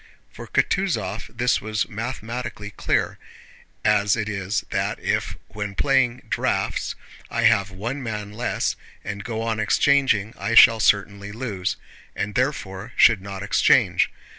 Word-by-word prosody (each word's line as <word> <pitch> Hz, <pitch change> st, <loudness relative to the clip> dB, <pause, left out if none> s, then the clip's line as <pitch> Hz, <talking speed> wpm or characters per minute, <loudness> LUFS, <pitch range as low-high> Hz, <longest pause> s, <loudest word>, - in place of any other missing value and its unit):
For -, -, -10 dB
Kutúzov 115 Hz, -, -1 dB
this 125 Hz, +1 st, +2 dB
was 110 Hz, -1 st, -2 dB
mathematically 115 Hz, -2 st, -5 dB
clear, -, -, -1 dB, 0.7 s
as 105 Hz, -1 st, +3 dB
it 105 Hz, -2 st, -2 dB
is 100 Hz, 0 st, -2 dB
that -, -, -1 dB
if -, -, -2 dB
when 105 Hz, -1 st, -5 dB
playing 130 Hz, -2 st, +2 dB
draughts -, -, -1 dB, 0.3 s
I -, -, -1 dB
have 100 Hz, 0 st, +4 dB
one 115 Hz, +9 st, -5 dB
man 105 Hz, -4 st, -5 dB
less 120 Hz, +3 st, -1 dB, 0.3 s
and 100 Hz, 0 st, -5 dB
go 115 Hz, 0 st, -4 dB
on 115 Hz, -1 st, -1 dB
exchanging, 110 Hz, -1 st, +2 dB
I 115 Hz, -, -1 dB
shall 115 Hz, -1 st, +8 dB
certainly 100 Hz, -1 st, +1 dB
lose, 105 Hz, -5 st, -3 dB, 0.4 s
and 105 Hz, 0 st, -3 dB
therefore 125 Hz, -5 st, -2 dB
should 110 Hz, -5 st, +5 dB
not 100 Hz, -1 st, -7 dB
exchange. 100 Hz, -, +3 dB
110 Hz, 135 wpm, -23 LUFS, 100-120 Hz, 0.7 s, shall